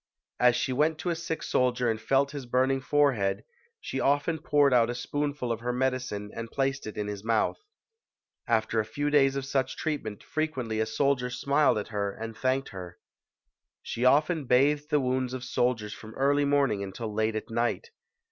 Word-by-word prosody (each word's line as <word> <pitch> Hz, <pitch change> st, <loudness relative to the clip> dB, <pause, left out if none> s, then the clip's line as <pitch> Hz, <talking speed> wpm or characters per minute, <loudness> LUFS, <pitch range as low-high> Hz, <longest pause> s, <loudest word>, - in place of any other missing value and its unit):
As 125 Hz, -1 st, +5 dB
she 130 Hz, -, -1 dB
went 155 Hz, +4 st, +2 dB
to 165 Hz, +3 st, -2 dB
a -, -, -1 dB
sick 165 Hz, -1 st, -4 dB
soldier 125 Hz, -1 st, +1 dB
and 110 Hz, -1 st, -1 dB
felt 135 Hz, +4 st, +2 dB
his 140 Hz, -4 st, -7 dB
burning 130 Hz, +2 st, +2 dB
forehead, 135 Hz, -9 st, +1 dB, 0.4 s
she 135 Hz, -, -4 dB
often 145 Hz, +4 st, +1 dB
poured 145 Hz, -3 st, +3 dB
out 120 Hz, -2 st, +4 dB
a 120 Hz, -, -2 dB
spoonful 145 Hz, 0 st, -2 dB
of 115 Hz, -, -2 dB
her 120 Hz, +1 st, -2 dB
medicine 125 Hz, -5 st, -2 dB
and 115 Hz, 0 st, -6 dB
placed 135 Hz, -1 st, -1 dB
it 110 Hz, -, -7 dB
in 105 Hz, -, -1 dB
his 105 Hz, -1 st, -5 dB
mouth. 115 Hz, -1 st, +1 dB, 0.9 s
After 110 Hz, -1 st, +1 dB
a -, -, +2 dB
few 145 Hz, +6 st, -2 dB
days 135 Hz, -2 st, +4 dB
of 135 Hz, -1 st, -2 dB
such 135 Hz, -1 st, -1 dB
treatment 125 Hz, -10 st, -3 dB
frequently 130 Hz, -8 st, -2 dB
a 110 Hz, -, +1 dB
soldier 125 Hz, +2 st, +1 dB
smiled 140 Hz, +2 st, +2 dB
at 105 Hz, -, -4 dB
her 100 Hz, -2 st, -2 dB
and 115 Hz, 0 st, -7 dB
thanked 130 Hz, +2 st, 0 dB
her. 90 Hz, -3 st, -9 dB, 0.9 s
She 120 Hz, -, -4 dB
often 150 Hz, +4 st, +3 dB
bathed 145 Hz, +4 st, +3 dB
the 150 Hz, -, +3 dB
wounds 130 Hz, -1 st, -1 dB
of 125 Hz, -, -6 dB
soldiers 120 Hz, -4 st, 0 dB
from 110 Hz, 0 st, -11 dB
early 145 Hz, +1 st, +2 dB
morning 140 Hz, -7 st, +2 dB
until 100 Hz, +3 st, -5 dB
late 110 Hz, +1 st, 0 dB
at 110 Hz, -, -5 dB
night. 120 Hz, -, -1 dB
130 Hz, 185 wpm, -28 LUFS, 115-140 Hz, 0.9 s, As